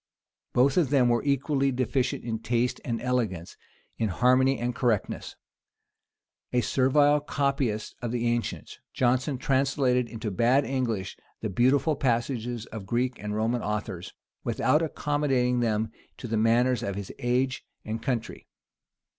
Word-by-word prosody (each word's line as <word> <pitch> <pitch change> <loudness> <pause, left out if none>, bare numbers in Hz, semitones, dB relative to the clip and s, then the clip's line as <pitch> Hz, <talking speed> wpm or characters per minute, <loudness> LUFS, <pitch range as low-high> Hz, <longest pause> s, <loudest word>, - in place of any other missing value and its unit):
Both 135 +5 +3
of 165 -8 +3
them 130 -4 +4
were 120 -1 +2
equally 140 0 +1
deficient 130 0 -1
in 115 -2 -3
taste 120 +2 0
and 115 -2 -2
elegance, 110 -9 -1 0.4
in 110 - +1
harmony 130 +6 +3
and 120 +1 -2
correctness. 115 -4 -1 1.2
A 125 - +2
servile 145 +5 +3
copyist 140 -6 -1
of 120 -2 -3
the 120 -1 -1
ancients, 120 0 -2 0.2
Jonson 130 +2 +1
translated 130 -2 +1
into 110 -2 -4
bad 120 +8 +3
English 115 -8 -2 0.2
the 110 - -3
beautiful 135 - +3
passages 120 -3 -1
of 110 - -7
the 95 - -13
Greek 125 +2 -1
and 105 0 -4
Roman 115 +2 0
authors, 105 -4 -4 0.3
without 150 - +2
accommodating 145 -5 0
them 110 -2 0 0.3
to 125 - -7
the 115 - -1
manners 115 +2 +3
of 100 - -3
his 100 -1 -5
age 125 +2 0 0.2
and 110 +1 -4
country. 120 -4 -3
125 Hz, 140 wpm, -27 LUFS, 115-135 Hz, 1.2 s, them